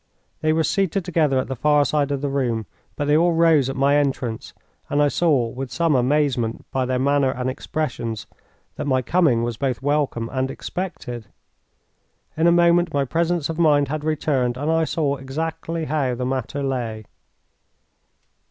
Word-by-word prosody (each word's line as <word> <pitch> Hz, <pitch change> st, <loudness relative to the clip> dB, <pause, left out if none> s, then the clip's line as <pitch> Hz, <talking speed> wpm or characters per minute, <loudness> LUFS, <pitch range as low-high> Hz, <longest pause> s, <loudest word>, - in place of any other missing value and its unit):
They 155 Hz, -, +1 dB
were 160 Hz, +1 st, +2 dB
seated 195 Hz, +1 st, 0 dB
together 155 Hz, -6 st, +1 dB
at 130 Hz, -, 0 dB
the 130 Hz, -, -4 dB
far 150 Hz, +3 st, +3 dB
side 145 Hz, -2 st, +1 dB
of 140 Hz, -1 st, -2 dB
the 145 Hz, -, -1 dB
room, 120 Hz, -5 st, -1 dB, 0.3 s
but 145 Hz, -, -2 dB
they 145 Hz, +1 st, +3 dB
all 170 Hz, +2 st, +4 dB
rose 165 Hz, -5 st, +4 dB
at 135 Hz, -, -4 dB
my 140 Hz, +2 st, +3 dB
entrance, 130 Hz, -5 st, -2 dB, 0.4 s
and 145 Hz, -, 0 dB
I 145 Hz, 0 st, +4 dB
saw 145 Hz, -7 st, +2 dB
with 130 Hz, +1 st, -6 dB
some 160 Hz, +6 st, +1 dB
amazement, 130 Hz, -3 st, +1 dB
by 130 Hz, -1 st, 0 dB
their 130 Hz, 0 st, 0 dB
manner 140 Hz, +1 st, +2 dB
and 130 Hz, 0 st, -2 dB
expressions, 125 Hz, -6 st, -4 dB, 0.5 s
that -, -, -3 dB
my 130 Hz, -2 st, +1 dB
coming 145 Hz, -6 st, +2 dB
was 120 Hz, -1 st, -3 dB
both 130 Hz, -1 st, -2 dB
welcome 145 Hz, -5 st, 0 dB
and 130 Hz, 0 st, -1 dB
expected. 135 Hz, -, -6 dB, 1.1 s
In 160 Hz, +2 st, +2 dB
a -, -, +6 dB
moment 175 Hz, 0 st, +4 dB
my 140 Hz, -1 st, +2 dB
presence 165 Hz, +2 st, 0 dB
of 165 Hz, 0 st, -5 dB
mind 145 Hz, -4 st, +4 dB
had 155 Hz, 0 st, -3 dB
returned, 140 Hz, -5 st, 0 dB
and 145 Hz, +4 st, -1 dB
I 160 Hz, 0 st, +2 dB
saw 145 Hz, -3 st, -1 dB
exactly 160 Hz, +4 st, -4 dB
how 140 Hz, -5 st, 0 dB
the 125 Hz, +1 st, -3 dB
matter 135 Hz, +2 st, -2 dB
lay. 120 Hz, -5 st, -3 dB
140 Hz, 175 wpm, -22 LUFS, 130-155 Hz, 1.1 s, a